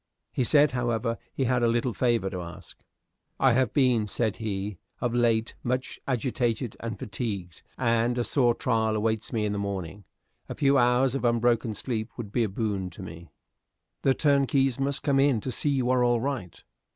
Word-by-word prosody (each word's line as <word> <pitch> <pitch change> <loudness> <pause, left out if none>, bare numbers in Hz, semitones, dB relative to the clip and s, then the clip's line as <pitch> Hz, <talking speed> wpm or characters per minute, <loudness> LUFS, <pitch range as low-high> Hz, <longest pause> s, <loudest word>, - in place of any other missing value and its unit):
He 130 - 0
said, 145 +2 +4
however, 120 -2 -1
he 135 - -2
had 125 -1 +1
a 120 - +3
little 120 +1 +1
favor 120 -5 +1
to 90 - -4
ask. 85 0 -10 0.6
"I 135 - +5
have 130 +1 +2
been," 125 -6 +2
said 110 0 -1
he, 100 -4 -4 0.2
"of 120 -2 -1
late 115 -2 +2
much 125 +1 -2
agitated 120 -2 -1
and 115 -2 -5
fatigued, 100 -6 -5 0.2
and 120 0 +1
a 120 - +1
sore 120 -2 +2
trial 110 -3 +1
awaits 110 0 -1
me 110 -4 0
in 105 - -1
the 100 - -2
morning. 100 -1 -5 0.4
A - - -4
few 140 -1 +3
hours 125 +1 +3
of 135 - -2
unbroken 120 -1 +2
sleep 110 0 -3
would 110 -5 -6
be 120 - +1
a 110 - -1
boon 100 -2 -2
to 90 +2 -10
me." 85 -1 -10 0.7
"The 135 -1 +3
turnkeys 135 -3 +2
must 140 +1 -1
come 140 -2 +2
in 135 -4 +3
to 130 - -3
see 145 - 0
you 130 -3 +1
are 125 -1 +3
all 120 -1 +3
right." 125 -8 -4
120 Hz, 190 wpm, -27 LUFS, 110-130 Hz, 0.7 s, I